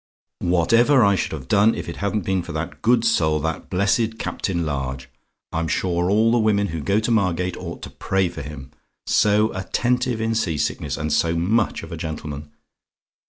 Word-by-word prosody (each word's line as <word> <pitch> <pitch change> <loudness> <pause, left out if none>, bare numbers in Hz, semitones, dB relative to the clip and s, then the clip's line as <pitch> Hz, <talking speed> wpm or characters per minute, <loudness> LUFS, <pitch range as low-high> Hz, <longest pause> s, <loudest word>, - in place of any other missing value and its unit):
"Whatever 115 - +4
I 100 - +4
should 95 - -1
have 70 -5 -6
done 105 +6 +4
if - - -6
it 85 - -6
hadn't 100 -1 -2
been 95 -1 +1
for - - -8
that - - -5
good 120 0 +3
soul 80 -9 +2
that 80 0 -3
blessed 110 +4 +1
Captain 85 -6 -2
Large! 65 -3 -3 0.4
I'm 80 0 -1
sure 90 +2 0
all 110 +3 +3
the 120 - +3
women 105 -2 +2
who 80 -1 -4
go 100 +7 +1
to 110 +2 -1
Margate 90 -4 +1
ought 85 -2 -7
to - - -7
pray 95 -1 0
for 85 - -7
him; 70 -2 -9 0.3
so 105 +1 +3
attentive 125 +5 0
in 110 0 0
sea 90 -9 0
sickness, 75 0 -2
and 75 -1 -2
so 85 0 +2
much 100 +7 +1
of - - -9
a - - -5
gentleman! 75 -2 -6
95 Hz, 190 wpm, -22 LUFS, 80-110 Hz, 0.4 s, Whatever